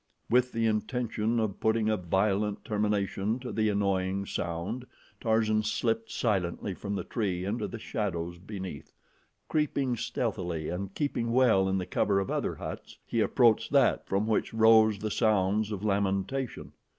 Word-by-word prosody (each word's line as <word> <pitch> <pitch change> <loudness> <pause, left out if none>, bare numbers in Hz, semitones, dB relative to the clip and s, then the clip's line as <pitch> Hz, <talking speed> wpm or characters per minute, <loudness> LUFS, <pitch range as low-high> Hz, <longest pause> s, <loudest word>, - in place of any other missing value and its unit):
With 125 +1 +4
the 115 0 0
intention 115 +1 0
of 110 -3 -2
putting 110 0 +2
a 110 - +3
violent 100 +3 0
termination 105 0 0
to 125 - -5
the 110 -1 +1
annoying 100 -1 0
sound, 95 +10 -4 0.3
Tarzan 110 -2 +2
slipped 115 +1 -1
silently 95 -3 -1
from 100 +2 -4
the - - -2
tree 95 -6 -2
into 105 +5 -2
the - - -6
shadows 85 -6 -3
beneath. 95 -5 -7 0.5
Creeping 140 -4 0
stealthily 90 -9 -2
and 95 +3 -4
keeping 120 -5 -1
well 115 -7 +4
in 95 - +1
the 90 - -2
cover 100 +2 +1
of 95 - -2
other - - -1
huts, - - -7
he 115 - -1
approached 115 0 +3
that - - +3
from 100 +2 +1
which 110 0 0
rose 110 -1 +6
the 105 +1 -3
sounds 105 -1 +2
of 105 -1 -4
lamentation. 100 +5 -1
105 Hz, 150 wpm, -29 LUFS, 95-115 Hz, 0.5 s, rose